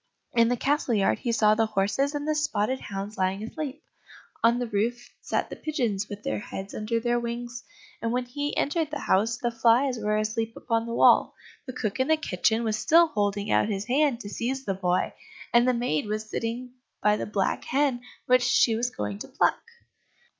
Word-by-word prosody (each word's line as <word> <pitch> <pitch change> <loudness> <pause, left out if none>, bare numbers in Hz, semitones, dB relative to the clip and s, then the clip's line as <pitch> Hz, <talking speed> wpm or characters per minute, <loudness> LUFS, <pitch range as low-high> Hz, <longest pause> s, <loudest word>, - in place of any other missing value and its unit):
In 230 -1 +4
the 245 +1 +1
castle 275 -2 +1
yard 200 -2 +2
he 240 - -1
saw 215 -2 +4
the 225 0 +2
horses 215 +8 0
and 290 +1 -3
the 310 - +2
spotted 260 -4 0
hounds 200 +1 -6
lying 190 +2 0
asleep; 295 +5 -6 0.6
on 230 +1 +5
the 245 - -1
roof 235 +3 -1
sat - - -2
the - - -4
pigeons 235 - -2
with 205 0 -8
their 110 - -2
heads 190 - -7
under 220 +2 -1
their 240 +1 +1
wings. 240 +1 -5 0.4
And 230 - -1
when 250 +1 0
he 290 +4 -4
entered 315 +1 0
the 300 - -3
house, 220 +5 +2
the 240 -1 -1
flies 235 +2 +3
were 210 0 0
asleep 220 +1 -2
upon 230 -1 -1
the 230 - -3
wall, - - +5 0.3
the 255 - -5
cook 215 -4 -3
in 260 - +2
the 315 0 +4
kitchen 220 - 0
was 215 -1 -1
still 330 +9 +5
holding 205 -5 -1
out - - +3
his 200 -1 -2
hand 265 0 +2
to 205 - -7
seize 260 +5 -3
the 195 - 0
boy, 180 -1 0 0.4
and 240 +1 +5
the - - +5
maid 220 -8 -1
was 215 +1 -3
sitting 235 +3 -4 0.3
by 210 0 +4
the - - -4
black 200 -2 -1
hen 270 -3 +1 0.2
which 255 0 +4
she 245 -1 +4
was 240 +2 0
going 105 - -5
to - - -7
pluck. - - +1
230 Hz, 205 wpm, -26 LUFS, 210-255 Hz, 0.6 s, on